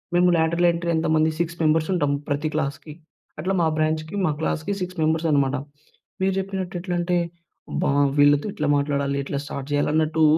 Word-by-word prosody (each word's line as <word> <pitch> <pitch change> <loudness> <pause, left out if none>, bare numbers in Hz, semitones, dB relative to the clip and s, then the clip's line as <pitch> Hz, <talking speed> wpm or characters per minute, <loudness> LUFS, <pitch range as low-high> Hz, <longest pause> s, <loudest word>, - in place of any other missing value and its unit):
మేము 180 0 +5
lateral 170 +2 +2
entry 170 0 -3
ఎంతమంది 160 0 +2
six 170 0 -2
members 155 +1 +2
ఉంటాం 145 -5 +1 0.2
ప్రతి 145 +2 0
క్లాస్‌కి. 150 0 -3 0.5
అట్లా 185 +5 -1
మా 165 - +3
బ్రాంచ్‌కి 155 +2 -1
మా 155 - +2
క్లాస్‌కి 160 +4 -1
6 180 0 -4
మెంబర్స్ 160 +1 +1
అనమాట. 140 -1 +2 0.7
మీరు 190 0 +2
జెప్పినట్టు 190 -1 -4
ఎట్లంటే 175 -1 0 0.5
అబ్బా! - - 0 0.3
వీళ్ళతో 145 0 +5
ఎట్లా 150 -1 -2
మాట్లాడాలి? 140 -1 0
ఎట్లా 140 0 -3
స్టార్ట్ 140 -1 -6
చేయాలి? 145 0 +1
అన్నట్టు 160 0 +2
160 Hz, 160 wpm, -23 LUFS, 145-175 Hz, 0.7 s, మేము